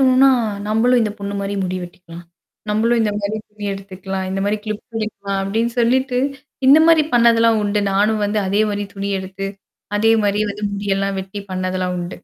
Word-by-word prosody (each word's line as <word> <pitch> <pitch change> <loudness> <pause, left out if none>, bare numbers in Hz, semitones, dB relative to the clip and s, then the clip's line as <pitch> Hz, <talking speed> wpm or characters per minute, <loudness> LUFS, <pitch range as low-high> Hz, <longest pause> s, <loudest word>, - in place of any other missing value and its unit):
தோணும்னா, 265 0 +6 0.4
"நம்பளும் 240 +3 +3
இந்த 210 -1 -1
பொண்ணு 200 0 -4
மாரி 200 +1 -3
முடி 185 0 -2
வெட்டிக்கலாம். 175 -1 -11 0.5
நம்மளும் 230 +3 +2
இந்த 210 -1 0
மாரி 205 +2 -2
துணி 210 0 -9
எடுத்துக்கலாம். 190 -1 -5
இந்த 195 0 -2
மாரி 210 +1 +1
கிளிப் 215 0 -5
பண்ணிக்கலாம்." 200 -3 -3
அப்படின்னு 225 +4 -1
சொல்லிட்டு, 250 +2 +2 0.5
இந்த 290 +3 +9
மாரி 325 -2 +6
பண்ணதெல்லாம் 230 -2 +4
உண்டு. 205 0 0
நானும் 210 +2 +2
வந்து 210 +1 0
அதே 205 +3 +2
மாரி 205 0 -2
துணி 200 0 -3
எடுத்து, 190 +1 -5 0.5
அதே 225 +2 +4
மாரி 205 0 +1
வந்து 210 +1 -5
முடியெல்லாம் 195 -1 -1
வெட்டி 195 +1 -7
பண்ணதெல்லாம் 185 0 -2
உண்டு. 175 0 -5
205 Hz, 170 wpm, -19 LUFS, 195-225 Hz, 0.5 s, இந்த